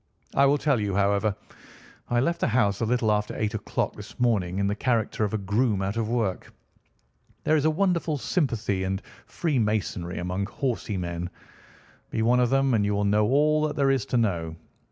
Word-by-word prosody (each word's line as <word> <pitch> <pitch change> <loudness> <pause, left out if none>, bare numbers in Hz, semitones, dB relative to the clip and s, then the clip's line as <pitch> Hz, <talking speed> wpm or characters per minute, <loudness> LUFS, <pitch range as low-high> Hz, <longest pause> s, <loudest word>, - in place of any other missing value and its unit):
I 140 0 +5
will 145 +1 +3
tell 145 -5 +1
you, 100 -2 -1
however. 100 +1 +2 0.7
I 120 - +2
left 170 +6 0
the - - +1
house 105 -4 +2
a 115 - +1
little 120 -2 +2
after 105 0 -1
eight 110 0 -1
o'clock 110 - -2
this - - -11
morning 100 -7 +1
in 100 - +1
the 100 - +1
character 110 -1 0
of 105 - 0
a - - +2
groom 105 +1 0
out 100 +2 -2
of 115 -1 -1
work. 115 -6 -1 0.9
There 155 - +3
is 150 -1 +1
a - - +5
wonderful 170 -2 +1
sympathy 115 - -1
and 95 +1 -2 0.2
freemasonry 110 - -1
among 90 +3 -2
horsey 115 -3 -2
men. 85 -1 -4 0.8
Be 110 - -1
one 120 +2 +4
of 125 -1 +3
them, 135 0 +2
and 105 -3 +3
you 100 0 0
will 100 0 0
know 105 +1 +3
all 150 +4 +3
that 150 - -5
there 140 -2 +3
is 135 -1 0
to 125 - 0
know. 85 -8 0
110 Hz, 195 wpm, -26 LUFS, 100-135 Hz, 0.9 s, I